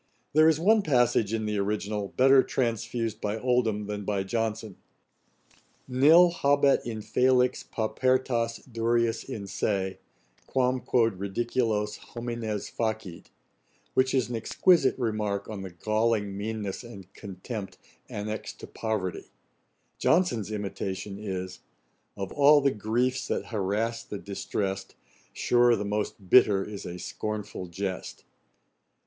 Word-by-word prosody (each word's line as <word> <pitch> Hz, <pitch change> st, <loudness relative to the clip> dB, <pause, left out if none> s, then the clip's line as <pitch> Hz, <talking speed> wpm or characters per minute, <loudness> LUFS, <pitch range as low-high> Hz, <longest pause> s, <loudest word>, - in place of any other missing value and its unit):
There 155 Hz, +2 st, +6 dB
is 160 Hz, -1 st, +2 dB
one 215 Hz, +5 st, +4 dB
passage 120 Hz, -, +2 dB
in 110 Hz, -1 st, -1 dB
the 105 Hz, -1 st, -1 dB
original, 105 Hz, 0 st, -2 dB
better 135 Hz, +1 st, +7 dB
transfused 115 Hz, -3 st, -2 dB
by 105 Hz, +1 st, -1 dB
Oldham 115 Hz, -3 st, +1 dB
than 105 Hz, 0 st, -4 dB
by 100 Hz, -1 st, -1 dB
Johnson: 110 Hz, 0 st, -3 dB, 1.1 s
'Nil 155 Hz, +7 st, +6 dB
habet 140 Hz, -3 st, +3 dB
infelix 125 Hz, +3 st, +1 dB
paupertas 120 Hz, 0 st, 0 dB
durius 115 Hz, -1 st, 0 dB
in 110 Hz, -7 st, -6 dB
se, 95 Hz, -1 st, -2 dB, 0.5 s
Quàm 130 Hz, -1 st, +1 dB
quod 115 Hz, -6 st, +2 dB
ridiculos 105 Hz, +1 st, -1 dB, 0.2 s
homines 115 Hz, -3 st, -3 dB
facit;' 110 Hz, -6 st, -4 dB, 0.6 s
which 130 Hz, +1 st, +2 dB
is 130 Hz, -3 st, +2 dB
an 120 Hz, -, -4 dB
exquisite 160 Hz, +6 st, +3 dB
remark 105 Hz, -4 st, -2 dB
on 105 Hz, -3 st, -6 dB
the 95 Hz, -, -6 dB
galling 110 Hz, +2 st, 0 dB
meanness 105 Hz, 0 st, -4 dB
and 100 Hz, -6 st, -12 dB
contempt 95 Hz, 0 st, -7 dB, 0.3 s
annexed 105 Hz, +1 st, -5 dB
to -, -, -6 dB
poverty: 100 Hz, -6 st, -3 dB, 0.7 s
JOHNSON'S 155 Hz, -, +2 dB
imitation 100 Hz, -1 st, -4 dB
is, 95 Hz, -3 st, -5 dB, 0.6 s
'Of 95 Hz, -1 st, -4 dB
all 145 Hz, +1 st, +6 dB
the 140 Hz, -1 st, +2 dB
griefs 125 Hz, +4 st, -1 dB
that -, -, -2 dB
harass 110 Hz, +3 st, -1 dB
the 105 Hz, -, -6 dB
distrest, 95 Hz, -1 st, -4 dB, 0.4 s
Sure 120 Hz, -1 st, +3 dB
the 105 Hz, -, -3 dB
most 105 Hz, -1 st, -3 dB
bitter 100 Hz, -6 st, +6 dB
is 105 Hz, -2 st, -7 dB
a 90 Hz, -, -6 dB
scornful 105 Hz, +1 st, -5 dB
jest.' 95 Hz, +2 st, -5 dB
110 Hz, 120 wpm, -27 LUFS, 100-125 Hz, 1.1 s, better